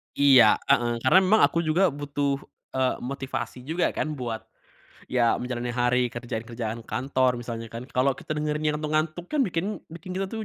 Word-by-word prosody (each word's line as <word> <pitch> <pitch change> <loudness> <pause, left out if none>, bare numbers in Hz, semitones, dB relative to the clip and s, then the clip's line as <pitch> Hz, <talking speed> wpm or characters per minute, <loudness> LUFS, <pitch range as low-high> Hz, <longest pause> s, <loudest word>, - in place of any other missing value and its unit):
Iya, 130 -6 +7 0.2
heeh, 120 0 +3
karena 155 +9 +6
memang 190 +3 +4
aku 170 - +3
juga 170 +2 +2
butuh, 140 -1 -2 0.3
eee, 130 -1 +1
motivasi 130 -1 -5
juga 165 +3 +1
kan, 155 -1 -3
buat 120 -4 -5 0.6
ya 120 -2 +3
menjalani 125 -1 -3
hari, 125 0 +2
kerjaan-kerjaan 115 -1 -5
kantor 130 -1 0
misalnya 115 -1 -6
kan 115 +2 -6
kalo 135 +1 +2
kita - - -5
dengerinnya 150 0 0
ngantuk-ngantuk 155 +2 -1
kan, 300 - +2
bikin 180 -8 0 0.2
bikin 170 +3 -9 0.2
tuh 220 +2 -5
135 Hz, 155 wpm, -26 LUFS, 120-155 Hz, 0.6 s, Iya